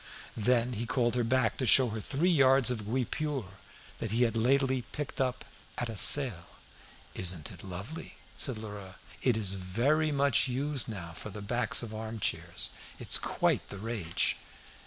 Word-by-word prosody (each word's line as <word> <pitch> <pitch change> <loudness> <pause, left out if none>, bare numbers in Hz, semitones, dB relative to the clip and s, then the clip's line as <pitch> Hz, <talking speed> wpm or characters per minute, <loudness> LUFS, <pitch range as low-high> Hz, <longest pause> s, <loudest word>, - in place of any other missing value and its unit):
Then 120 +2 +1
he 115 +1 -4
called 120 0 +1
her 120 -1 +1
back 120 0 +1
to 130 - -1
show 130 0 +7
her 110 0 -5
three 155 - 0
yards 135 -4 +5
of 110 -4 -4
guipure 130 +2 -2 0.5
that 115 - -3
he 115 +4 +2
had 115 -2 0
lately 130 +2 +2
picked 140 +3 -5
up 125 -1 -2 0.3
"at 120 - 0
a 115 - -5
sale." 105 - +6 0.7
"Isn't 90 -4 -2
it 90 -4 -12
lovely?" 100 - -8 0.2
said 130 -1 -1
Lheureux. 105 -3 -8 0.3
"It 125 -4 +2
is 100 -3 +1
very 120 +12 0
much 140 -3 +3
used 135 +2 -1
now 90 -6 -6
for 95 - -9
the 105 0 -8
backs 120 +3 +1
of 110 -2 -7
arm 110 +1 -6
chairs. - - -2 0.3
It's - - +2
quite - - -1
the 100 - -7
rage." 105 -5 -1
120 Hz, 170 wpm, -30 LUFS, 105-130 Hz, 0.7 s, show